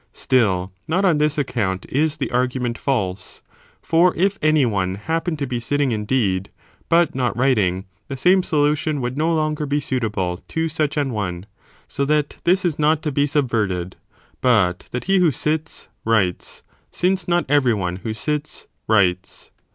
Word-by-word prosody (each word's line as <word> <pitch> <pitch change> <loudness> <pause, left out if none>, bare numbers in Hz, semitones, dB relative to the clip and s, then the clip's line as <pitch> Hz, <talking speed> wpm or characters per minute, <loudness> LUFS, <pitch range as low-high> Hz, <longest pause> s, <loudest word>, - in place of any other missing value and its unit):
Still, 100 -8 +1 0.2
not 185 +5 +1
on 165 -5 +3
this 150 0 +1
account 100 -9 -1
is 150 +2 0
the 140 - -2
argu 125 +1 0
ment 120 -1 -2
false, 95 -9 -3 0.4
for 170 +2 +3
if 195 +3 +1
any 155 -2 +3
one 95 -5 -1
happen 160 - -2
to 145 - -2
be 125 -2 -3
sitting 140 +3 0
indeed, 105 -4 0 0.4
but 170 +1 +3
not 125 -4 -1
writing, 105 -8 +1 0.2
the 135 - -5
same 185 +7 +4
solution 150 -1 0
would 125 0 -3
no 160 +3 +1
longer 155 -2 -1
be 145 +1 +1
suitable 105 -10 -2
to 165 0 -1
such 155 -1 -1
an 140 -4 0
one, 90 -4 -3 0.4
so 140 - -2
that 150 0 0
this 185 +2 +3
is 160 -4 -1
not 155 +1 +2
to 150 - -1
be 145 +1 +1
subverted, 105 - -1 0.5
but 100 -8 +2
that 125 - -3
he 195 0 +2
who 175 -2 +4
sits, 155 +3 -3 0.2
writes, 100 -6 0 0.3
since 185 +1 0
not 175 0 +1
every 130 -5 +3
one 90 -3 -3
who 110 +3 -5
sits, 150 +6 -3 0.2
writes. 95 -4 0
135 Hz, 165 wpm, -21 LUFS, 105-155 Hz, 0.5 s, same